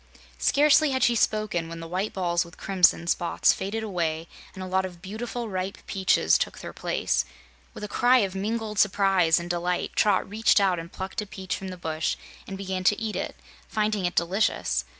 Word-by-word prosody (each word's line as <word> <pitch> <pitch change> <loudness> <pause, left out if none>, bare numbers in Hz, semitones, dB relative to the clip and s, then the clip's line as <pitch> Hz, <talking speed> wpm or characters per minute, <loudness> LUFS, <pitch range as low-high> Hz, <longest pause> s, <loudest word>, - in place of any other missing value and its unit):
Scarcely 300 +1 +4
had 260 -1 0
she 240 - +4
spoken 215 -7 0
when 165 0 -7
the 165 - -7
white 185 +5 -2
balls 175 -2 0
with 170 0 -15
crimson 180 -3 +3
spots 170 0 +2
faded 215 +4 -4
away 165 -5 -2 0.3
and 190 - -6
a - - -4
lot 190 +1 +1
of 180 -2 -7
beautiful 230 +5 -5
ripe 190 -1 -3
peaches 190 -1 +2
took - - -2
their - - -8
place. - - 0 0.5
With - - -8
a - - -3
cry 245 +5 +4
of 190 - -6
mingled 210 +1 -2
surprise 195 -5 +3
and 170 - -6
delight 175 0 -1
Trot 210 - +3
reached 220 +2 +3
out 190 -3 +2
and 165 +1 -9
plucked 190 +2 -4
a 210 - -7
peach 190 -2 -4
from 190 - -7
the 185 -1 -7
bush 160 -2 -2 0.3
and 195 - -6
began 190 -1 -3
to 205 - +4
eat 220 -1 -3
it, - - -3 0.3
finding 210 -3 0
it 175 - -1
delicious. 170 - +1
190 Hz, 195 wpm, -26 LUFS, 175-210 Hz, 0.5 s, Scarcely